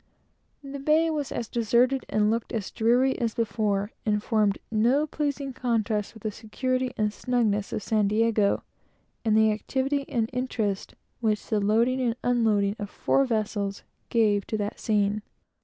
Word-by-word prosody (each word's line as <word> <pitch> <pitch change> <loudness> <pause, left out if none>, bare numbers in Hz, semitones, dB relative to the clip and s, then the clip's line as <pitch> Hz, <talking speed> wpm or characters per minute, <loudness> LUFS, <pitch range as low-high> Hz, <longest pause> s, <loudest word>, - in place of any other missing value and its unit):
The 275 0 -7
bay 310 +3 +3
was 295 -4 -3
as 235 - -3
deserted, 240 +3 +2
and 210 0 +2
looked 230 0 -2
as 215 -5 -3
dreary, 245 +4 +2
as 230 -3 -1
before, 210 -3 0
and 210 -1 0
formed 210 -3 +2
no 240 +7 +3
pleasing 285 -2 -3
contrast 225 -4 -1
with 220 - -14
the 215 - -1
security 255 +4 -2
and 210 -1 0
snugness 220 -6 0
of 210 - -3
San 215 -2 +2
Diego, 215 -1 +2 0.6
and 220 -2 +3
the 220 0 +5
activity 270 +6 -1
and 230 -3 0
interest 225 -6 -2 0.2
which 215 -2 0
the 215 - 0
loading 230 +6 +2
and 235 -2 +1
unloading 215 -5 +2
of 205 -1 -4
four 275 +5 +1
vessels 210 -4 -2 0.3
gave 210 -4 +2
to 220 - -2
that 205 0 -3
scene. 210 -1 +1
225 Hz, 155 wpm, -26 LUFS, 210-255 Hz, 0.6 s, the